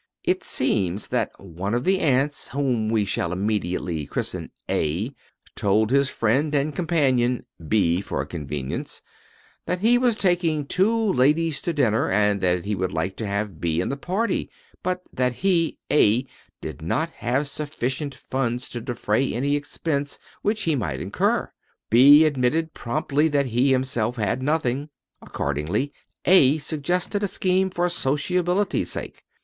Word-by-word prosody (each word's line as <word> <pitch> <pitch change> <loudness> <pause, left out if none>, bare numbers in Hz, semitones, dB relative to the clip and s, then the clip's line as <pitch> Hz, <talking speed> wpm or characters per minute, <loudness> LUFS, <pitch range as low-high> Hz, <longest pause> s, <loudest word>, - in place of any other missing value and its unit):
It 370 +1 0
seems 100 -6 0
that - - 0
one 95 +3 -4
of 120 - -1
the 190 +3 +2
ants, 140 -1 +1
whom 125 -5 0
we 110 -2 +2
shall 90 -3 -1
immediately 90 -5 -2
christen - - -3 0.2
A, 90 - -1 0.4
told 105 +3 +2
his 140 0 +3
friend 135 +8 +1
and 145 +2 +1
companion, 130 -8 +1 0.2
B 90 -3 +2
for 70 -8 -3
convenience, 70 -3 -5 0.6
that 180 0 -1
he 240 +3 +5
was 245 -3 +3
taking 175 - +1
two 215 +5 +2
ladies 150 +4 +2
to 170 - -1
dinner 125 -8 +1
and 105 0 +2
that 90 -1 +1
he 105 - -1
would 95 -2 -1
like 95 +1 -2
to 110 - -3
have 100 -4 -3
B 80 -1 0
in - - -1
the 140 - -1
party, 190 +10 -1 0.3
but 180 0 -2
that 125 -1 +1
he, 170 +2 +1
A, 125 -2 +4 0.4
did - - -7
not 160 - -1
have 130 +3 -1
sufficient 145 -1 -3
funds 125 -1 -3
to 120 - -5
defray 120 +2 0
any 140 +5 0
expense 145 0 -2 0.2
which 215 0 0
he 160 -4 +1
might 120 - -2
incur. - - 0 0.4
B 140 +7 +8
admitted 155 +3 +1
promptly 140 +6 0
that 145 -2 +1
he 125 +2 +2
himself 130 -3 0
had 110 +2 -1
nothing. 145 -1 0 0.3
Accordingly, 75 - -2 0.3
A 155 -6 +6
suggested 170 +7 -1
a 205 - +1
scheme 190 0 +1
for 175 -1 0
sociability's 180 +5 0
sake. - - -6
135 Hz, 150 wpm, -24 LUFS, 105-160 Hz, 0.6 s, B